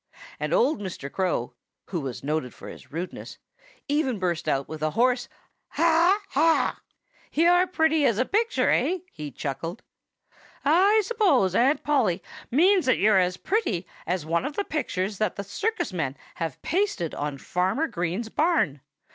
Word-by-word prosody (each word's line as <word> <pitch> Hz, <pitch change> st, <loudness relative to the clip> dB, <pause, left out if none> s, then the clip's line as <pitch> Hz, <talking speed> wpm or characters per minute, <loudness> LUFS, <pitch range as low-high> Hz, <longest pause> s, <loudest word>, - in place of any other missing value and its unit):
And -, -, -2 dB
old 470 Hz, -, +3 dB
Mr. 175 Hz, -8 st, -6 dB
Crow, 180 Hz, -11 st, -1 dB, 0.4 s
who 175 Hz, -4 st, -1 dB
was 130 Hz, -3 st, -6 dB
noted 145 Hz, -3 st, -2 dB
for -, -, -10 dB
his -, -, -12 dB
rudeness, 170 Hz, +4 st, -6 dB, 0.5 s
even 285 Hz, -5 st, 0 dB
burst 175 Hz, -4 st, -1 dB
out 135 Hz, 0 st, 0 dB
with 155 Hz, -1 st, -7 dB
a 155 Hz, -, +1 dB
hoarse 245 Hz, 0 st, +2 dB, 0.4 s
haw 335 Hz, +3 st, +3 dB
haw. 320 Hz, +4 st, +2 dB, 0.5 s
"You're 355 Hz, +3 st, +4 dB
pretty 320 Hz, -3 st, +2 dB
as 230 Hz, -, +2 dB
a 255 Hz, -, +2 dB
picture, 450 Hz, -, +1 dB
eh?" 370 Hz, -, +2 dB
he 150 Hz, -1 st, -7 dB
chuckled. 160 Hz, -, -5 dB, 0.8 s
"I 385 Hz, +9 st, +5 dB
suppose 360 Hz, -, +2 dB
Aunt 265 Hz, +8 st, +3 dB
Polly 220 Hz, -12 st, +1 dB, 0.3 s
means 360 Hz, +5 st, +4 dB
that 255 Hz, -, +4 dB
you're 210 Hz, -2 st, +4 dB
as 180 Hz, 0 st, +1 dB
pretty 225 Hz, -, -1 dB, 0.2 s
as 175 Hz, -2 st, -1 dB
one 170 Hz, +2 st, 0 dB
of 290 Hz, +2 st, -4 dB
the 405 Hz, -, 0 dB
pictures 200 Hz, -10 st, -2 dB
that 215 Hz, -4 st, 0 dB
the 200 Hz, -, -4 dB
circus 410 Hz, -, -2 dB
men 140 Hz, -6 st, -2 dB, 0.2 s
have 165 Hz, -6 st, -4 dB
pasted 355 Hz, -, 0 dB
on 145 Hz, -1 st, -3 dB
Farmer 185 Hz, -, 0 dB
Green's 180 Hz, -, -3 dB
barn. 295 Hz, -, +1 dB
215 Hz, 155 wpm, -26 LUFS, -, 0.8 s, I